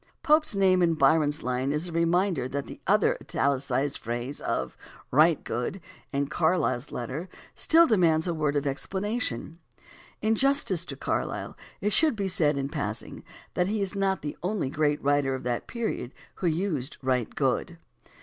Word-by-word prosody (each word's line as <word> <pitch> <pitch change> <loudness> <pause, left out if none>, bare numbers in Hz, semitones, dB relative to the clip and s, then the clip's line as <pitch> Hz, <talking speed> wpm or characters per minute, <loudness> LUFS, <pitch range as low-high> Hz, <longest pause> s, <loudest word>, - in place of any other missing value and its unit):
Pope's 305 -6 +3
name 190 -2 +4
in 165 -2 +3
Byron's 150 +1 +3
line 125 +2 -1
is 150 +4 0
a - - -7
reminder 170 -2 +1
that 140 +1 -3
the - - -10
other - - +4
italicized 140 0 0
phrase 120 +4 -4
of - - -2 0.4
"right 155 +3 +4
good" 125 +11 -3 0.3
in 140 0 0
Carlyle's 160 -4 0
letter 130 +9 -5 0.2
still 330 +1 +5
demands 170 - +3
a 175 - 0
word 150 -2 0
of 145 0 0
explanation. 175 - -2 0.6
In 220 +1 +2
justice 225 - +1
to - - -6
Carlyle - - -3 0.3
it 210 0 +1
should 305 +3 +4
be 200 -2 -2
said, 150 -5 +2
in 135 0 -1
passing, 140 -8 -4 0.3
that 180 - +1
he 215 +2 -1
is 195 -1 -1
not 195 -1 0
the 150 - -4
only 180 -6 -1
great 150 -1 +1
writer 140 -1 +2
of 130 - -7
that 120 -1 -2
period 225 - -4 0.2
who 180 - -1
used 160 -5 -1
"right 125 -3 0
good." - - 0
160 Hz, 165 wpm, -27 LUFS, 140-190 Hz, 0.6 s, still